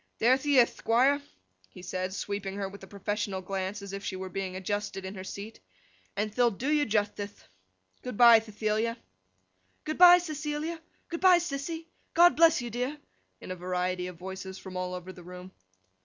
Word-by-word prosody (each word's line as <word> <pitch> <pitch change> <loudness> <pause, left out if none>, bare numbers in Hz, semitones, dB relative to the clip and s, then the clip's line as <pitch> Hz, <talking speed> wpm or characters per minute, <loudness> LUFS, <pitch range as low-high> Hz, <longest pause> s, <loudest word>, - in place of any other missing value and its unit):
'There 240 +3 +5
the 285 0 +2
ith, 240 -2 +4
Thquire,' 265 +5 +3 0.5
he 180 - -13
said, 185 +1 -3
sweeping 200 0 -4
her 200 -1 -3
with 200 +1 -11
a 190 - -11
professional 200 0 -3
glance 190 +2 -4
as 200 -1 -8
if 195 0 -5
she 195 - -3
were 190 0 -6
being 185 0 -4
adjusted 205 0 -3
in 190 - -5
her 185 -2 -7
seat, 200 +3 -8 0.6
'and 210 +1 -1
the'll 240 +2 +3
do 245 +7 -3
you 300 -1 +2
juthtithe. 205 -1 -2 0.6
Good 250 -5 -6
bye, 235 -2 +9
Thethilia!' 220 +1 -2 0.9
'Good 310 +2 -4
bye, 355 0 +10
Cecilia!' 310 0 -4 0.3
'Good 335 - -5
bye, 370 -1 +7
Sissy!' 325 0 -4 0.3
'God 350 +1 +7
bless 330 -5 +5
you, 240 - -5
dear!' 250 +6 -2 0.4
In - - -8
a - - -3
variety 180 0 -2
of 180 -2 -9
voices 190 +1 -7
from 190 -1 -10
all 180 0 -3
the 180 0 -11
room. 180 +1 -10
205 Hz, 180 wpm, -29 LUFS, 190-265 Hz, 0.9 s, bye